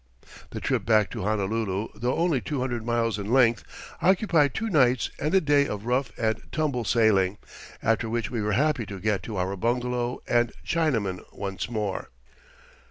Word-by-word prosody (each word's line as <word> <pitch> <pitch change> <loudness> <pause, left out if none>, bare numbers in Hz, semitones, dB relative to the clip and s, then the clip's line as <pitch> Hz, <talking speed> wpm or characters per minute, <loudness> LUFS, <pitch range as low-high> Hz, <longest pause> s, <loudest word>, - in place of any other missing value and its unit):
The - - -6
trip - - 0
back 110 -3 +3
to - - -5
Honolulu, 105 0 -1
though 120 +4 -1
only 165 -6 +1
two 145 +1 -3
hundred 120 -3 -2
miles 115 -2 0
in 100 +2 -4
length, 120 -5 +4 0.4
occupied 175 - +3
two 225 - -1
nights 130 - +3
and 150 +2 -1
a - - +7
day 145 -3 +3
of 105 0 -5
rough 125 -1 0
and 110 -1 0
tumble 140 -7 -1
sailing, 105 -4 +3 0.5
after 115 0 +1
which 115 0 -2
we 115 -3 -2
were 105 0 0
happy 140 -2 +1
to 100 -1 -7
get 105 0 0
to 110 -3 -6
our 95 +2 -1
bungalow 120 +3 -1
and 120 -1 +2
Chinaman 115 - 0 0.2
once 95 +1 -4
more. 105 -4 -3
115 Hz, 170 wpm, -26 LUFS, 105-130 Hz, 0.5 s, a